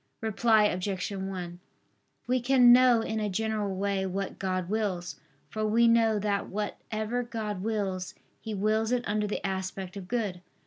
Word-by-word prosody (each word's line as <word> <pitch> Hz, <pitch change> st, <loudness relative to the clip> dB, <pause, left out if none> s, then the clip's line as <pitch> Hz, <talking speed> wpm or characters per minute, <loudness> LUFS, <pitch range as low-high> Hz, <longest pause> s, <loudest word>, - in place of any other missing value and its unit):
Reply 220 Hz, 0 st, +3 dB
Obj. 190 Hz, 0 st, -1 dB
1: 190 Hz, -3 st, -5 dB, 0.7 s
We 250 Hz, 0 st, +1 dB
can 245 Hz, -1 st, +6 dB
know 250 Hz, -2 st, +6 dB
in 220 Hz, 0 st, -2 dB
a 210 Hz, -1 st, -1 dB
general 210 Hz, -1 st, -1 dB
way 195 Hz, 0 st, -1 dB
what 195 Hz, +1 st, -4 dB
God 185 Hz, -2 st, -1 dB
wills. 195 Hz, -4 st, -2 dB, 0.3 s
For 215 Hz, -, -4 dB
we 225 Hz, +2 st, +4 dB
know 225 Hz, -2 st, +4 dB
that 205 Hz, -1 st, -1 dB
whatever 215 Hz, +3 st, -3 dB
God 220 Hz, -5 st, -4 dB
wills, 195 Hz, -4 st, -2 dB, 0.2 s
He 220 Hz, -1 st, -5 dB
wills 215 Hz, +3 st, +1 dB
it 250 Hz, -1 st, 0 dB
under 210 Hz, 0 st, 0 dB
the 205 Hz, -, -4 dB
aspect 190 Hz, 0 st, -4 dB
of 195 Hz, -2 st, -7 dB
good. 205 Hz, -6 st, -2 dB
210 Hz, 160 wpm, -28 LUFS, 190-225 Hz, 0.7 s, can